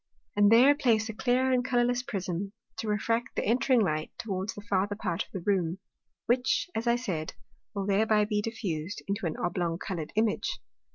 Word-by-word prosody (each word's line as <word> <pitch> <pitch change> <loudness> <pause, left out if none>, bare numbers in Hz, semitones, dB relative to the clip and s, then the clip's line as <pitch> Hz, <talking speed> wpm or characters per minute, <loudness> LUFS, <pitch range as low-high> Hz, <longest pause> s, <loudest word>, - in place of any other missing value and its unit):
And 205 0 +5
there 250 +5 +8
place 230 -7 +2
a - - -3
clear 255 +3 +2
and 250 -1 +2
colourless 245 0 +2
Prism, 195 -5 -4 0.2
to 225 - -4
refract 230 +4 0
the - - -1
entring 250 +2 +3
Light 155 -6 0
towards 195 -1 -3
the 205 - -7
farther 200 +1 +1
part 180 -3 -2
of - - -22
the 190 - -5
Room; 185 -4 +1 0.5
which, 250 +2 +2
as 230 +2 -2
I 235 - +4
said, 185 -11 -3 0.4
will 200 -1 -2
thereby 210 +1 +3
be 210 0 0
diffused 205 -6 -4
into 200 -2 -1
an 155 - -4
oblong 175 -1 -1
coloured 170 -4 -5
Image. 220 0 0
210 Hz, 180 wpm, -29 LUFS, 190-235 Hz, 0.5 s, there